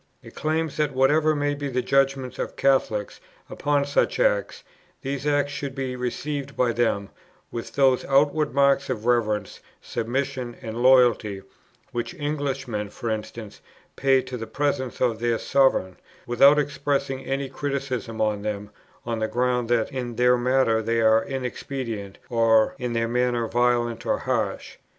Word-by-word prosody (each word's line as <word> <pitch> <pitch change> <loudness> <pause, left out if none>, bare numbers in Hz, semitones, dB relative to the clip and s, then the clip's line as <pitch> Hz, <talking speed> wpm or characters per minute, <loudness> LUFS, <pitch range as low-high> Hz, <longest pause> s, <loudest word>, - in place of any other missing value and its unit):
It - - -13
claims 155 0 -2
that, 150 -3 0
whatever 150 +4 +3
may 145 0 0
be 145 0 -4
the 125 -2 -1
judgment 135 -2 +1
of - - -4
Catholics 110 -6 +1 0.3
upon 145 -1 0
such 145 - +1
acts, - - +1 0.4
these 140 +1 -3
acts 145 -1 +1
should 140 -2 -5
be 130 -2 -3
received 140 +3 -4
by 125 -2 +2
them 105 -4 0 0.4
with 115 - -6
those 135 -2 +3
outward 145 +2 +2
marks 140 +1 +3
of 115 -4 -3
reverence, 110 -4 0 0.2
submission, 125 +1 -3
and 115 -1 -5
loyalty, 120 -6 +4 0.5
which 120 -1 -4
Englishmen, 135 -8 -3
for 115 +2 -4
instance, 110 -1 -6 0.3
pay 135 -1 +3
to 130 -1 -6
the 115 -1 -6
presence 140 -3 -2
of 120 -3 +1
their 120 0 +1
sovereign, 130 -9 +2 0.3
without 135 +4 +5
expressing 140 -2 -1
any 135 0 -2
criticism 135 -5 -4
on 105 -1 0
them 105 0 -4 0.3
on 115 -1 -2
the 110 - 0
ground 125 0 0
that 120 0 +1
in 125 -3 -4
their 125 +1 +4
matter 125 -2 +2
they 115 +1 0
are 110 0 +4
inexpedient, 125 -5 -5
or 115 -2 +3
in 125 -2 -3
their 115 0 0
manner 120 -1 0
violent 120 -1 +1
or - - +2
harsh. - - -2
125 Hz, 150 wpm, -24 LUFS, 115-140 Hz, 0.5 s, without